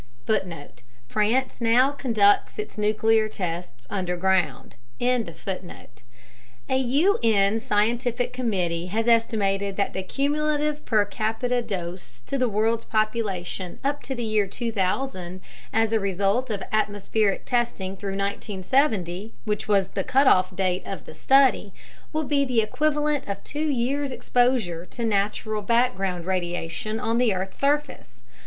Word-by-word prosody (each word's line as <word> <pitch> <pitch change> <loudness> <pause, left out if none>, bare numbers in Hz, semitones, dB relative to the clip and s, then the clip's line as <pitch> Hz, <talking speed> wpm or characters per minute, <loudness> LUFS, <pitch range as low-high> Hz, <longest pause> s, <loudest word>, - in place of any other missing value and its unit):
(France 230 - 0
now 240 +4 +4
conducts 225 -8 +2
its 425 0 -5
nuclear 215 +1 +2
tests 170 - -5
underground.) 180 -7 0 0.2
A 160 - -5
U.N. 240 - +3
scientific 240 +2 0
committee 180 -9 -1
has 220 +5 -1
estimated 200 -4 +2
that 200 - -1
the 190 - -2
cumulative 295 +6 -1
per 215 -3 +3
capita 225 +4 -1
dose 175 - -6
to 275 - -3
the 250 -2 +2
world's 220 +2 +1
population 205 -5 -2
up 280 +1 -1
to 265 - -4
the 240 - -3
year 215 -2 +1
2000 190 -3 -2 0.3
as 225 0 +2
a 225 - +4
result 200 +5 0
of 205 -3 -3
atmospheric 210 -1 0
testing 230 -6 -1
through 195 0 -4
1970 200 - -1 0.7
(cutoff 190 -9 +4
date 185 -1 0
of 195 - -7
the - - -10
study) 265 -7 +3 0.4
will 310 0 -1
be 285 -1 +2
the 250 -4 +2
equivalent 295 +3 0
of 200 0 -4
2 290 - -6
years' 280 -1 0
exposure 245 -10 +1
to 235 +6 -4
natural 210 +1 0
background 195 -6 +1
radiation 180 +3 -2
on 230 +1 0
the 230 -6 +3
earth's 190 +1 -5
surface. 280 - -1
215 Hz, 120 wpm, -25 LUFS, 190-250 Hz, 0.7 s, now